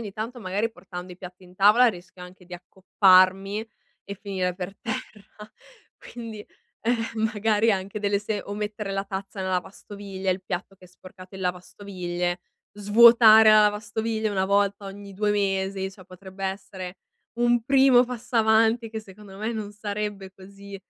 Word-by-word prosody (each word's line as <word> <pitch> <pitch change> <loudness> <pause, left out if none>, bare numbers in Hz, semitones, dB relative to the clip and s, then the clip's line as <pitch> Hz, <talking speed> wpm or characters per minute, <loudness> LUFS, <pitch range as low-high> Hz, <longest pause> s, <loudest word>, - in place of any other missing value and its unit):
ogni 205 -4 -7
tanto 230 +4 -6
magari 205 +4 -1
portando 180 -3 -10
i - - -13
piatti 185 0 -12
in 180 0 -18
tavola 210 +6 +5
rischio 180 -3 -5
anche 180 +1 -15
di 180 0 -10
accopparmi 190 +2 +2 0.4
e 200 - -7
finire 185 -3 -2
per 190 +1 -6
terra, 215 -2 -8 0.6
quindi, 225 -3 -8 0.4
ehm, 225 -1 -1
magari 215 +1 +2
anche 195 +1 -3
delle 200 -1 +1
se 210 0 -4
o 200 - -7
mettere 210 -1 -5
la 195 0 -2
tazza 195 0 -7
nella 185 0 -2
lavastoviglie, 195 +1 -6
il 185 +1 -7
piatto 190 +1 -5
che 185 -1 -18
è - - -22
sporcato 185 +1 -14
in 190 - -7
lavastoviglie, 180 -1 -4 0.3
svuotare 220 +1 +7
la 215 0 +7
lavastoviglie 215 +1 -1
una 190 -2 0
volta 200 0 0
ogni 200 0 -10
2 210 +1 0
mesi, 195 -1 -1
cioè 190 -1 -15
potrebbe 190 +1 -10
essere 190 -1 -6 0.4
un 240 -1 +2
primo 265 -1 +5
passo 245 0 -9
avanti 225 +1 +3
che 220 - -5
secondo 200 -1 -13
me 220 +2 -3
non 215 -2 -5
sarebbe 205 -2 -5
così 200 +1 -12
200 Hz, 160 wpm, -25 LUFS, 190-215 Hz, 0.6 s, svuotare